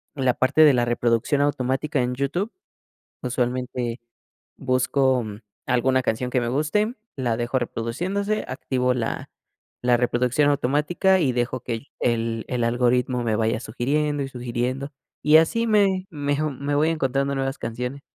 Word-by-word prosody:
la 130 -3 +2
parte 130 +4 +3
de 150 -3 +7
la 120 -1 +2
reproducción 120 +4 +1
automática 140 0 0
en 125 +1 -1
YouTube. 175 - -1 0.7
Usualmente 125 -1 -2 0.6
busco, 130 0 +1
mm, 105 -1 -7 0.3
alguna 130 +1 +2
canción 125 +1 -1
que 125 - +1
me 120 - -1
guste, 155 - 0 0.2
la 120 -4 0
dejo 120 +3 0
reproduciéndose, 180 - -2
activo 125 -1 0
la 120 -2 -3 0.5
la 125 0 +4
reproducción 125 +4 +2
automática 150 +7 +2
y 135 -5 +2
dejo 120 +1 -1
que 125 - -5
el 115 +4 -5
el 115 -1 0
el 125 -2 -1
algoritmo 125 +1 +1
me 110 -2 +1
vaya 110 +1 0
sugiriendo 145 +6 -1
y 135 - -4
sugiriendo, 125 +3 -3 0.3
y 150 +2 +7
así 230 +9 +2
me 195 -4 +2
me, 145 -2 -1
oh, 155 - 0
me 140 +1 -3
voy 155 +3 +3
encontrando 140 -2 0
nuevas 135 0 -2
canciones. 125 +5 -4
130 Hz, 150 wpm, -24 LUFS, 120-145 Hz, 0.7 s, de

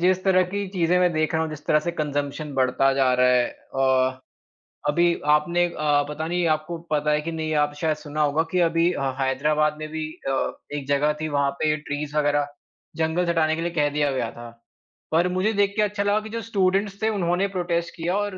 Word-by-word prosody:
जिस 185 +1 +2
तरह 185 -1 +4
की 200 0 -2
चीजें 180 -2 +1
मैं 180 -1 +3
देख 155 +1 0
रहा 160 - +2
हूँ, 160 - -3
जिस 155 -1 -9
तरह 150 - +4
से 170 +2 -3
कंजम्प्शन 145 -1 -3
बढ़ता 130 +1 +2
जा 135 -1 +3
रहा 125 - +5
है। 125 -1 +4 0.6
अ, 130 0 -14 0.7
अभी 170 +3 +3 0.2
आपने 175 +3 0
अ, 150 -4 +1
पता 155 +2 -4
नहीं 175 0 0
आपको 160 +3 -7
पता 150 0 +1
है 150 0 +2
कि 165 +2 -4
नहीं, 160 -1 -3
आप 145 - -9
शायद 155 -2 +1
सुना 150 0 -4
होगा 150 +2 +2
कि 180 - +1
अभी 165 +1 +2 0.3
हैदराबाद 150 +3 +1
में 155 - -5
भी 160 0 -3 0.2
अ, 135 -1 0 0.3
एक 140 -2 -6
जगह 145 +1 +2
थी 155 - -1
वहाँ 140 0 +2
पे 155 -1 +3
ट्रीज़ 150 0 -5
वगैरह, 145 -1 +2 0.5
जंगल 165 +2 0
हटाने 160 -2 +2
के 165 - -4
लिए 170 +1 -2
कह 150 -3 +1
दिया 145 -1 0
गया 125 -4 -2
था। 120 0 -10 0.6
पर 165 +3 +3
मुझे 190 +4 +1
देख 200 -1 +2
के 215 - +2
अच्छा 205 0 0
लगा 205 +1 +2
कि 215 - -9
जो 230 +1 -4
स्टूडेंट्स 200 0 0
थे 220 - +2
उन्होंने 185 -1 0
प्रोटेस्ट 170 -2 -2
किया 175 +3 -1
और 205 -2 -2
160 Hz, 215 wpm, -24 LUFS, 145-180 Hz, 0.7 s, रहा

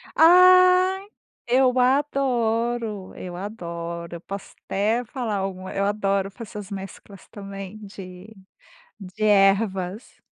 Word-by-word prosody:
Ai 365 +3 +6 0.4
eu 255 +1 +3
adoro, 240 -6 0
eu 180 -1 -7
adoro, 170 -4 -6
eu - - -16
posso 195 0 -8
até 220 +5 0
falar 230 -4 -4
alguma 190 -1 -5
eu 200 0 0
adoro 200 -1 0
fazer 210 +1 -9
as 200 - -9
mesclas 195 0 -9
também 195 -1 -8
de, 185 -1 -11 0.7
de 195 +3 -5
ervas. 195 0 +1
205 Hz, 110 wpm, -23 LUFS, 190-245 Hz, 0.7 s, Ai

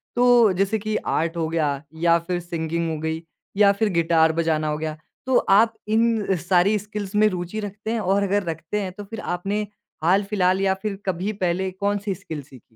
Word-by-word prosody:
तो 245 -3 +5
जैसे 195 +4 0
कि 215 +1 -3 0.2
आर्ट 165 +2 -1
हो 160 -1 0
गया 155 -3 +1 0.3
या 170 0 +5
फिर 180 -1 -1
सिंगिंग 170 -1 -3
हो 155 - -3
गई 160 +1 -3 0.4
या 200 -1 +6
फिर 220 - +2
गिटार 165 -1 +3
बजाना 160 -2 0
हो 150 - -1
गया। 155 0 -4 0.3
तो 260 -1 +3
आप 225 +3 +4
इन 220 -3 +2
सारी 180 +4 +2
स्किल्स 210 -1 -6
में 215 +1 +5
रुचि 180 +3 -4
रखते 210 +2 -5
हैं 230 - 0
और 200 0 +1
अगर 200 0 +1
रखते 165 +5 -3
हैं 185 -2 -4
तो 205 +1 -8
फिर 225 +2 -8 0.2
आपने 200 +4 -2 0.4
हाल 190 +4 +4
फिलहाल 190 -2 +2
या 190 -1 +3
फिर 210 -2 -2
कभी 190 +3 -1
पहले 190 -1 -1
कौन 200 +2 -1
सी 200 - 0
स्किल 160 -3 -7
सीखीं? 130 -2 -16
190 Hz, 200 wpm, -23 LUFS, 165-210 Hz, 0.4 s, या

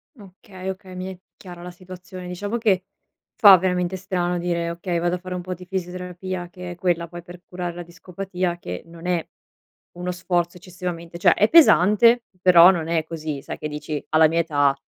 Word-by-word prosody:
Okay, 190 -3 -10
okay. 190 -1 -8
Mi 185 +1 -5
è 180 - -17 0.2
chiara 175 -2 -11
la 180 - -8
situazione. 185 0 -10
Diciamo 205 +5 -3
che 195 -5 +1 0.5
fa 200 -5 +9
veramente 180 0 -1
strano 180 -1 -2
dire: 170 -1 -1
"Okay, 170 0 -3
vado 175 +1 0
a - - -4
fare 185 0 -6
un 180 - -4
po' 185 +1 -5
di 180 +1 -11
fisioterapia." 180 -1 -5
Che 180 -1 -8
è - - -7
quella 175 -1 0
poi, 175 +1 -9
per 175 +1 -13
curare 180 -1 -5
la 175 - -6
discopatia 180 +1 -4
che 90 - -6
non 170 +1 -13
è 175 -3 0 0.7
uno 180 +1 -3
sforzo 175 -1 -1
eccessivamente 175 -1 -7
cioè, - - +5
è 210 - +2
pesante, 230 - +6 0.2
però 180 0 +8
non 165 -3 -3
è 165 -2 0
così 155 -3 -5
sai, - - -6
che 150 - -3
dici: 150 0 -5
"Alla 155 0 +5
mia 165 +2 0
età, 145 -4 +2
180 Hz, 195 wpm, -23 LUFS, 170-185 Hz, 0.7 s, fa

